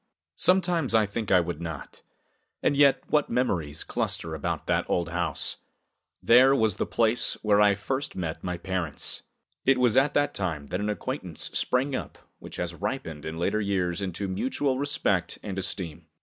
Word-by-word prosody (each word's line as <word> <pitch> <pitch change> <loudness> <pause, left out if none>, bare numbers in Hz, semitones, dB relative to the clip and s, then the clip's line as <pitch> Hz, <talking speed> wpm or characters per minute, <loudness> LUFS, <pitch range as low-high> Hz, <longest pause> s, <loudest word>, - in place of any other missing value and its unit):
Sometimes 175 -9 +2
I 110 -1 +5
think 105 +2 -4
I 95 - +6
would 85 0 -3
not. 80 -4 -7 0.6
And - - +3
yet, 140 -1 +5
what 150 -2 +2
memories 85 - 0
cluster 80 - -2
about 80 - -3
that - - 0
old 85 -2 0
house! 85 -3 -2 0.7
There 130 +3 +7
was 110 -6 +2
the - - -1
place 115 +1 +2
where 105 -1 +4
I 100 -1 +5
first 130 +7 -3
met 85 -3 -4
my 90 -1 -2
parents. 90 -5 -3 0.4
It 135 0 +4
was 125 -3 +3
at 135 +2 +3
that 145 0 +2
time 80 -7 -2
that 90 - -2
an 105 - -1
acquaintance 105 -4 -4
sprang 130 +2 +1
up - - -5 0.2
which - - -10
has 90 -1 -3
ripened 85 - -4
in 80 +1 -5
later 100 +5 0
years 95 -3 0
into 95 +1 -3
mutual 130 +7 -1
respect 100 -11 0
and 95 -2 -4
esteem. 90 -4 -4
100 Hz, 170 wpm, -27 LUFS, 85-125 Hz, 0.7 s, There